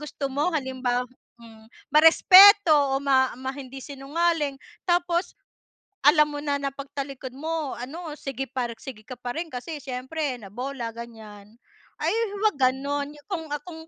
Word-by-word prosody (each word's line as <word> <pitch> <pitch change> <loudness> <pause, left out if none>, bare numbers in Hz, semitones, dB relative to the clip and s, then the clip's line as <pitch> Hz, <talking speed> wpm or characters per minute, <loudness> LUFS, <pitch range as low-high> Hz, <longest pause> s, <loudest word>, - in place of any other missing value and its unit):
gusto 300 -1 -5
mo 290 +5 +1
halimbawa 260 -4 -1 0.4
hmm, 225 -1 -15 0.3
ma-respeto 365 +4 +8 0.2
o - - -2
ma 260 -3 +2
ma 260 +1 -5
hindi 270 -1 -9
sinungaling 290 +1 -1 0.3
tapos, 345 0 +1 0.7
alam 300 +1 +6
mo 290 - -4
na 290 -1 -1
na 275 -1 -3
pagtalikod 275 -2 -7
mo 315 -1 -3
ano 300 +5 -7
sige 270 -2 -5
par 250 -2 -3
sige 240 -6 -10
ka 255 - -8
pa 245 0 -5
rin 330 0 -5
kasi 275 +5 -6
syempre 265 +2 -4
na 200 - -10
bola 250 0 -5
ganyan. 220 -2 -11 0.4
Ay - - 0 0.3
huwag 430 -4 +2
ganun, 280 +2 0
yung 295 +3 -18
kung 360 -5 -3 0.2
kung 330 -3 -9
275 Hz, 150 wpm, -25 LUFS, 255-315 Hz, 0.7 s, ma-respeto